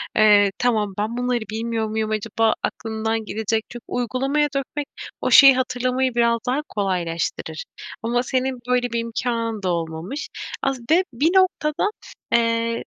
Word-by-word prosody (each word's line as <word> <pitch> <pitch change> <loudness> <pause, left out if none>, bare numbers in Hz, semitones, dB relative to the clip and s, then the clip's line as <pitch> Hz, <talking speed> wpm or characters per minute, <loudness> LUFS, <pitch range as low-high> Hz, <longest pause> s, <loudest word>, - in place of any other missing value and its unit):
eee, 205 -2 +6
tamam 215 -5 +1
ben 215 +3 -2
bunları 245 -1 0
bilmiyor 225 0 -2
muyum 220 0 -2
acaba 220 +1 +1
aklımdan 220 0 -2
gidecek. 220 +1 -1
Çünkü 240 -1 -9
uygulamaya 270 +5 0
dökmek 275 +1 -3 0.3
o - - 0
şeyi 275 -2 +9
hatırlamayı 255 0 0
biraz 235 -1 +3
daha 260 +4 +1
kolaylaştırır. 180 - -2 0.4
Ama 240 +2 +1
senin 255 0 -1
böyle 250 0 +2
bir 235 - 0
imkânın 230 -2 -2
da 185 - 0
olmamış. 170 - -4 0.4
Az 270 -2 0
be 340 +4 +5
bir 300 +9 +2
noktada, 370 -2 +2 0.4
eee, 230 0 +1
235 Hz, 140 wpm, -22 LUFS, 220-255 Hz, 0.4 s, şeyi